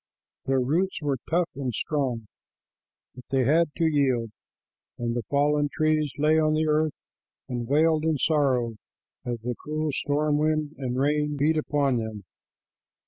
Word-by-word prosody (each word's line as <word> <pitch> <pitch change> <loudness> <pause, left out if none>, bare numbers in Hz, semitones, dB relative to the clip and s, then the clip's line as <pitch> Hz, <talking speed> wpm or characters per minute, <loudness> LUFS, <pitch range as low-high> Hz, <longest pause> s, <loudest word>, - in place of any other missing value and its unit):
Their 135 0 +2
roots 170 +9 0
were 140 -3 0
tough 170 +1 +1
and 130 -2 -3
strong, 130 -7 -1 0.9
but 125 - -12
they 135 -1 +2
had 160 +6 +3
to 165 - +1
yield, 130 -7 +1 0.7
and 120 0 -2
the 120 - 0
fallen 145 +1 +2
trees 155 -2 +1
lay 155 +2 +3
on 155 0 +2
the 155 +1 +1
earth 155 0 +1 0.5
and 120 -2 -4
wailed 155 +3 +3
in 160 -2 +2
sorrow 130 -7 +1 0.5
as 120 -2 -4
the 125 +2 -2
cruel 155 0 -2
storm 145 +2 0
wind 155 -1 +1
and 125 -2 -2
rain 150 +1 +1
beat 150 +3 +2
upon 145 -4 +1
them. 110 -3 -5
145 Hz, 150 wpm, -26 LUFS, 130-155 Hz, 0.9 s, had